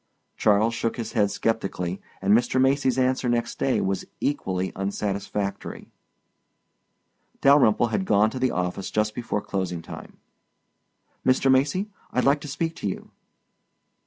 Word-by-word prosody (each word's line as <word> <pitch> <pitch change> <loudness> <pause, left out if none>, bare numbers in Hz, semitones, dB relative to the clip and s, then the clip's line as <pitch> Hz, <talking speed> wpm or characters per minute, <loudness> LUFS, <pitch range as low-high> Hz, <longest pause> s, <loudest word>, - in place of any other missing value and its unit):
Charles 110 +2 +3
shook 115 +1 -2
his 115 - -4
head 105 -3 +3
sceptically 95 -4 -2 0.2
and 100 +1 +4
Mr. 120 +2 +2
Macy's 130 -1 +2
answer 130 -1 +1
next 120 -1 -1
day 135 - +2
was 95 0 -1 0.2
equally 95 -10 -1
unsatisfactory. 100 0 -3 1.5
Dalyrimple 125 -5 +5
had 190 - 0
gone 110 - +3
to 130 - -5
the 130 0 +2
office 90 0 -2
just 110 0 0
before 115 -3 -2
closing 90 -4 -3
time. - - -10 1.1
"Mr. 130 +1 +3
Macy, 145 +11 +2 0.2
I'd 125 - +1
like 140 +2 +3
to - - -7
speak 165 +3 -2
to - - -3
you." - - -7
115 Hz, 135 wpm, -25 LUFS, 100-130 Hz, 1.5 s, Dalyrimple